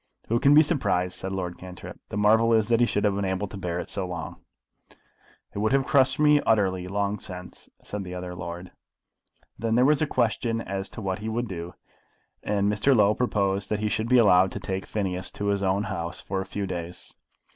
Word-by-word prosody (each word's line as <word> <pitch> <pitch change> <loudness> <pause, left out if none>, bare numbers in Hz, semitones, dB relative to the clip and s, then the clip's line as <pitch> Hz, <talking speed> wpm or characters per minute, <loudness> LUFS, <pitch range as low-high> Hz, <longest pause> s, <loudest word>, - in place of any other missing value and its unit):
"Who 115 +1 +2
can 140 +3 +5
be 155 - +8
surprised?" 100 - 0
said 95 - -4
Lord 90 -2 -4
Cantrip. 90 -1 -10
"The - - -4
marvel 110 +2 +4
is 110 0 +2
that 115 -1 +3
he 120 - +4
should 105 - -1
have 105 -2 +3
been 100 +1 -2
able 95 +1 -1
to 95 - -10
bear 90 -3 -3
it - - -5
so 95 -3 -3
long." 85 -1 -6 1.2
"It - - -4
would 110 +4 +1
have 135 -1 +3
crushed 135 -2 +3
me 150 -1 +5
utterly, 95 -5 +1
long 100 +1 -1
since," 90 -2 -9
said 105 -1 -5
the 90 -1 -7
other 90 0 -5
lord. 90 0 -7 0.9
Then 115 0 0
there 125 +2 +5
was 150 +1 +3
a 155 - +2
question 115 -2 0
asked - - -8
as 95 0 -3
to 110 - -8
what 95 -1 -2
he 110 +1 -4
would 120 +2 -2
do, 85 -2 -7 0.7
and 100 -1 0
Mr. 105 +7 +3
Low 105 -2 +5
proposed 100 -4 0
that 105 - 0
he 105 +1 -1
should 110 +1 -1
be 125 - +5
allowed 95 -5 +5
to - - -4
take 95 0 -4
Phineas 95 -3 -2
to 100 0 -2
his 100 -1 0
own 95 +1 +1
house 85 -4 -4
for 95 0 -3
a 95 - -7
few 100 -1 -3
days. 90 -2 -6
100 Hz, 220 wpm, -26 LUFS, 95-115 Hz, 1.2 s, be